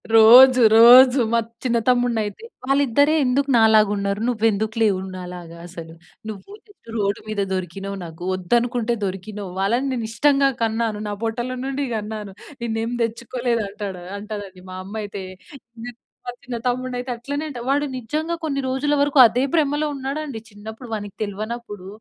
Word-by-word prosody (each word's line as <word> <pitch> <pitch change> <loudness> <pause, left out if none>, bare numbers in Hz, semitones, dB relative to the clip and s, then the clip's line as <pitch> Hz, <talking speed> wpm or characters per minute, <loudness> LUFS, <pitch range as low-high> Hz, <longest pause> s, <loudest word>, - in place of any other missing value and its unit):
రోజు, 250 +3 +8 0.2
రోజు 250 +3 +8
మా 235 - +4 0.2
చిన్న 240 -2 +1
తమ్ముడినైతే, 245 - 0 0.2
"వాళ్ళిద్దరే 280 +2 +3
ఎందుకు 275 +3 +1
నాలాగా 220 -2 +5
ఉన్నారు? 200 0 -2
నువ్వు 225 -3 0
ఎందుకు 215 +2 -3
లేవు 200 -4 +3 0.2
నాలాగా? 180 -2 -9
అసలు 165 -2 -10 0.4
నువ్వు 215 - -9 0.4
రోడ్డు 200 -2 -1
మీద 215 -2 -2
దొరికినావ్ 195 +2 -5
నాకు, 165 +1 -10
వద్దు 185 +5 0
అనుకుంటే 240 -1 -1
దొరికినావ్, 195 +1 -6
వాళ్ళని 235 +8 +1
నేను 235 -3 -3
ఇష్టంగా 275 +2 +3
కన్నాను. 225 -1 -1
నా - - -3
పొట్టల 240 +3 -3
నుండి 275 +1 -2
కన్నాను, 210 -2 -5 0.3
నిన్ను 225 -1 -2
ఏమి 240 +1 -3
తెచ్చుకోలేదు" 235 +1 -2
అంటాడు 200 -3 -7 0.2
అంటదండి 205 -3 -8
మా 185 - -7
అమ్మ 205 - -9
అయితే. 200 -1 -7 0.6
నే 245 - -6 0.4
మా - - -2
చిన్న 245 -1 -5
తమ్ముడిని 250 +1 -1
అయితే 250 0 -5
అట్లనే 285 +5 -5
అంట. 255 -5 -7
వాడు 285 +2 +1
నిజంగా, 305 +8 -3
కొన్ని 275 -3 -1
రోజులు 275 +3 0
వరకు 285 0 +1
అదే 235 +3 +2
బ్రమలో 300 -1 +1
ఉన్నాడండి 275 -1 -4
చిన్నప్పుడు, 220 +3 -10
వా‌ని‌కి 205 -2 -5
తెల్వ‌నప్పుడు, 210 -1 -5
230 Hz, 155 wpm, -22 LUFS, 205-255 Hz, 0.6 s, రోజు